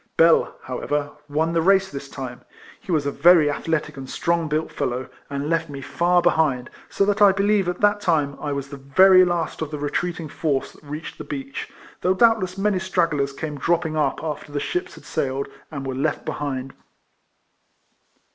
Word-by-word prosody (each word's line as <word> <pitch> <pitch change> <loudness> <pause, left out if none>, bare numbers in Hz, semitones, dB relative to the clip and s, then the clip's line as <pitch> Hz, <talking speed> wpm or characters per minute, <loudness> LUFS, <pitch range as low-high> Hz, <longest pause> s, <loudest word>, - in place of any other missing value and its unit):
Bell, 165 0 +4
however, 145 +3 -2 0.2
won 160 +3 0
the 165 - +2
race 195 +2 +3
this 140 0 -7
time. 130 -3 -7 0.4
He - - -7
was 155 -4 +1
a 140 - 0
very 155 0 +5
athletic 150 -1 -2
and 130 -1 -7
strong 170 -1 0
built 155 +1 -1
fellow, 130 -2 -3 0.2
and 140 0 -3
left 165 0 0
me 140 -1 -6
far 175 +5 +1
behind, 155 -7 +2 0.2
so 200 - +1
that 205 +1 0
I 200 -1 +8
believe 200 -1 +2
at 180 - -4
that 205 0 +3
time 150 -7 +1
I 145 - -2
was 140 -1 -3
the 140 - -8
very 185 +8 +6
last 175 -3 -1
of 160 - -2
the 150 - -5
retreating 165 +3 -2
force 145 -3 -1
that - - -19
reached 150 +2 -7
the - - -5
beach, 275 -1 -6 0.3
though 185 +1 +2
doubt 225 +2 +5
less 185 -1 -4
many 200 -1 +1
stragglers 165 -7 0
came 150 +1 -6
dropping 165 -1 0
up 150 -1 0
after 150 -2 -5
the 145 - -2
ships 360 - -3
had - - -15
sailed, 135 -3 -2 0.2
and 140 -3 -6
were 135 - -3
left 145 +4 -1
be - - -2
hind. 135 -2 -4
155 Hz, 195 wpm, -23 LUFS, 140-180 Hz, 0.4 s, I